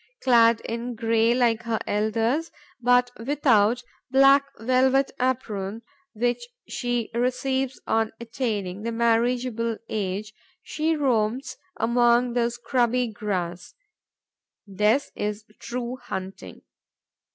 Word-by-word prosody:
Clad 230 -2 +5
in 235 +1 -4
grey 225 +1 +2
like 235 -3 +2
her 230 -1 -1
elders, 225 +9 0 0.3
but 245 0 +3
without 245 -4 +3 0.3
the 265 - -2
black 275 +1 +7
velvet 260 +4 +2
apron 230 -4 -2 0.3
which 245 - -1 0.2
she 245 -2 -2
receives 260 +2 -1
on 225 0 +1
attaining 215 -5 -3
the 230 +2 -3
marriageable 230 0 +1
age, 210 +1 -3 0.3
she 320 +1 -1
roams 255 -2 0 0.2
among 240 0 +3
the 235 -1 +1
scrubby 240 0 0
grass. 185 -5 -4 0.9
This 210 +7 +1
is 210 +1 -3
true 245 +1 -4
hunting. 190 -5 -7
235 Hz, 105 wpm, -25 LUFS, 220-250 Hz, 0.9 s, black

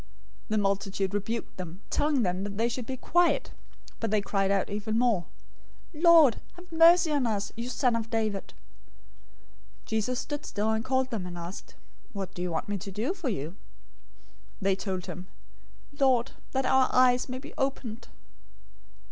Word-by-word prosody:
020:031 100 - -25 0.4
The 215 - +1
multitude 195 -1 0
rebuked 215 +3 -3
them, 180 +1 -7
telling 290 -4 +2
them 180 0 -1
that 200 0 -5
they 230 +2 +2
should 240 0 -4
be 260 - -4
quiet, 350 +6 +2 0.5
but 225 - -1
they 215 +1 +3
cried 195 -1 0
out 195 -1 +2
even 215 +2 -1
more, 225 -8 +2 0.7
"Lord, 320 -5 +6
have 355 0 -15
mercy 330 0 +6
on 280 -5 +2
us, 205 -2 -2
you 235 +2 -4
son 250 -2 +1
of 230 -1 -3
David!" 215 -4 -2 1.3
020:032 - - -29
Jesus 220 +3 -1
stood 290 -1 -4
still, 215 +1 -1
and 220 0 0
called 260 0 0
them, 200 -6 -3
and 175 -1 -7
asked, 170 +3 -8 0.4
"What 195 -2 -5
do 175 - -6
you 180 - -1
want 165 - -2
me 205 -1 -2
to 195 - -7
do 225 - -1
for 345 -8 -3
you?" 155 - -2
020:033 175 - -15 1.1
They 195 0 +3
told 190 -2 -4
him, 185 0 -7 0.7
"Lord, 260 -2 +3 0.2
that 265 0 +1
our 260 0 +4
eyes 250 0 +4
may 255 - -3
be 285 +3 -10
opened." 265 -4 -3
225 Hz, 175 wpm, -28 LUFS, 195-260 Hz, 1.3 s, Lord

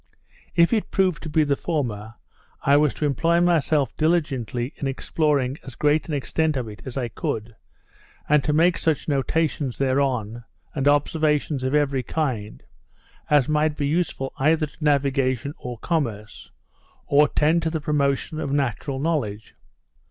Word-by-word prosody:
If 170 +4 +4
it 220 - 0
proved 185 -5 +1
to 160 - -6
be 155 +1 +3
the 145 -1 +1
former, 115 -10 -3 0.5
I 140 - +4
was 150 -1 +4
to 150 - -2
employ 165 +5 +2
myself 155 -6 +2
diligently 140 -7 0
in 140 - -3
exploring 140 0 0
as 130 -3 -10
great 150 +3 +1
an 155 - -2
extent 155 +2 0
of 125 -3 -3
it 105 +2 -10
as 130 - -6
I 125 -3 -1
could, 110 0 -4 0.7
and 150 -2 +4
to 150 - 0
make 170 +3 +3
such 160 -4 0
notations 145 -1 0
thereon, 130 -4 0 0.3
and 140 -2 0
observations 150 -1 +1
of 130 +3 0
every 140 -3 +1
kind, 125 -7 -3 0.7
as 145 -4 +4
might 150 0 +1
be 145 - -1
useful 145 -3 -1
either 155 +3 +3
to 150 +2 -12
navigation 140 -2 +1
or 125 -1 -6
commerce, 115 -8 -3 0.6
or 145 +1 +4
tend 155 +4 +2
to 160 - 0
the 160 0 -2
promotion 145 0 0
of 140 - -3
natural 135 -1 -1
knowledge. 135 -9 -2
145 Hz, 155 wpm, -23 LUFS, 130-155 Hz, 0.7 s, If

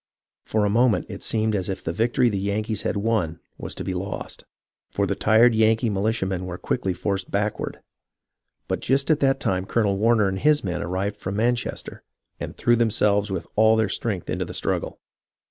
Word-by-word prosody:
For 110 -1 0
a - - +2
moment 120 +1 +3
it 100 -2 -7
seemed 110 -1 0
as 95 -2 -2
if 95 -1 -4
the 80 - -2
victory 120 +5 +2
the 100 -4 0
Yankees 105 +2 -2
had - - -1
won 100 -7 0 0.2
was - - -6
to - - -5
be 95 - -3
lost, 95 +2 -5 0.4
for - - 0
the - - 0
tired 115 +2 +4
Yankee 110 +1 +3
militiamen 95 -3 -1
were 90 -1 -5
quickly 95 - -1
forced 95 +1 -2
backward; 105 +1 -2 0.9
but - - -1
just 135 +4 +1
at 155 - +3
that 135 -1 +2
time 95 -7 -1
Colonel 100 -4 +1
Warner 110 -1 +4
and 95 0 -2
his 150 +3 +3
men 90 -2 -2
arrived 95 +3 -2
from 95 +2 -4
Manchester, 120 +3 -2 0.4
and - - -6
threw 120 - +3
themselves 105 -3 +2
with 95 -4 -3
all 110 +1 +5
their 110 -2 +1
strength 100 -3 -3
into - - -2
the - - -7
struggle. - - -2
105 Hz, 190 wpm, -24 LUFS, 95-115 Hz, 0.9 s, all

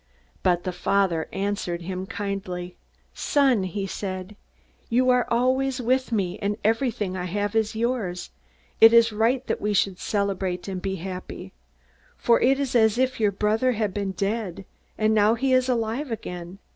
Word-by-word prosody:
"But 175 -1 +2
the 185 - -2
father 180 -3 0
answered 195 -3 -2
him 185 +1 -5
kindly. 190 -3 -4 0.4
'Son,' 270 -7 +2
he 195 +2 -3
said, 190 0 -5 0.5
'you 255 +2 +3
are 250 -1 +2
always 260 +2 +1
with 255 +1 0
me, 195 -4 -1
and 205 0 -1
everything 220 -4 0
I 180 -1 -3
have 205 +3 -2
is 220 -1 +1
yours. 220 -7 -2 0.5
It 225 +1 +9
is 230 -1 +6
right 240 +5 +1
that - - -2
we 210 0 0
should 190 -2 +1
celebrate, 195 -3 -2
and 190 -2 -4
be 190 0 -2
happy. 185 +1 -7 0.6
For 235 - +3
it 270 +2 +3
is 275 -2 -2
as 220 -1 +4
if 260 0 0
your 210 -2 +3
brother 215 +6 +1
had 215 -4 -1
been 200 -2 -2
dead, 195 -1 -3 0.3
and 215 0 +2
now 215 +1 +4
he 260 +2 +1
is 255 0 +3
alive 240 +4 -1
again. 180 -4 -6
205 Hz, 165 wpm, -25 LUFS, 190-235 Hz, 0.6 s, It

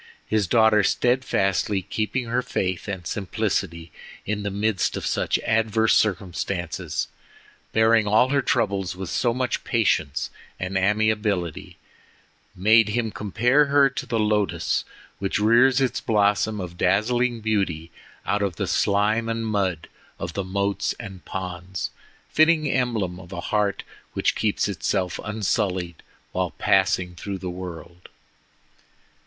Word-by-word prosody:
His 110 -3 +1
daughter 110 0 +5
steadfastly 100 -4 +1
keeping 110 +6 -2
her 120 +2 0
faith 95 -6 -2
and 95 -3 -5
simplicity 90 -4 -2 0.3
in 105 0 -2
the 100 - -2
midst 100 0 0
of - - -4
such - - +1
adverse 110 0 +2
circumstances—bearing 95 +3 -1
all 110 +5 +4
her 140 0 +2
troubles 100 -8 0
with 95 -1 -6
so 120 - +1
much 125 0 -2
patience 95 - 0 0.3
and 95 +1 -4
amiability—made 105 +1 0
him 115 0 -1
compare 120 +9 +2
her 140 -1 +4
to 125 - -5
the 115 -2 -1
lotus 105 -2 0 0.3
which 95 0 -1
rears 120 +5 +5
its 130 -2 0
blossom 105 0 +2
of 90 -2 -7
dazzling 120 +6 +2
beauty 95 -7 -1 0.3
out 105 - 0
of 100 -4 -1
the - - -2
slime 105 +3 +1
and 115 0 -2
mud 95 -6 -1 0.3
of 85 - -5
the 100 - -2
moats 100 +1 -1
and 95 -5 -9
ponds, 90 0 -5 0.4
fitting 155 -1 +3
emblem 115 -9 -1
of 90 -2 -13
a 90 - -5
heart 105 +1 0 0.3
which - - +1
keeps 105 -2 0
itself 95 -2 -1
unsullied 95 -5 -1 0.3
while 90 -1 -1
passing 95 -3 +2
through 95 +3 -5
the 90 -1 -5
world. 90 -1 -9
105 Hz, 125 wpm, -24 LUFS, 95-110 Hz, 0.4 s, daughter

